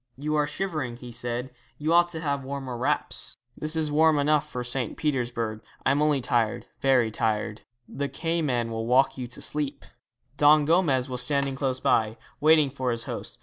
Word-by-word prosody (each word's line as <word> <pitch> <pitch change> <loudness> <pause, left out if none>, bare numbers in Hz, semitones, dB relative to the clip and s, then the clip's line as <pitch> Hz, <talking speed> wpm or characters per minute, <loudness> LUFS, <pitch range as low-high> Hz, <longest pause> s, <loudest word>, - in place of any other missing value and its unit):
'You 150 +3 -2
are 150 -1 +2
shivering,' 150 -9 -3
he 125 0 -10
said; 120 +2 -4 0.3
'you 155 +2 0
ought 175 0 +5
to 165 -2 -5
have 140 -3 -1
warmer 135 -2 -5
wraps. 120 - -2 0.2
'This 155 +1 -3
is 155 -2 0
warm 155 +1 +4
enough 150 +1 +2
for 125 -3 -4
St. 125 -1 -1
Petersburg. 120 -7 -2 0.2
I 130 - +4
am 145 +2 +2
only 150 -3 +2
tired 120 -3 0
very 125 -4 +3
tired.' 110 0 -1 0.3
'The 140 0 -3
Cayman 140 -6 -1
will 115 0 -3
rock 130 +2 +3
you 125 - -4
to 120 - -8
sleep.' 145 -2 -2 0.5
Don 150 0 +6
Gomez 150 -6 +2
was 125 -2 -2
standing 140 +1 +1
close 135 -2 -1
by, 110 0 +1 0.2
waiting 155 -2 +5
for 130 -2 -2
his 115 -1 -1
host. - - -6
135 Hz, 185 wpm, -26 LUFS, 120-150 Hz, 0.5 s, Don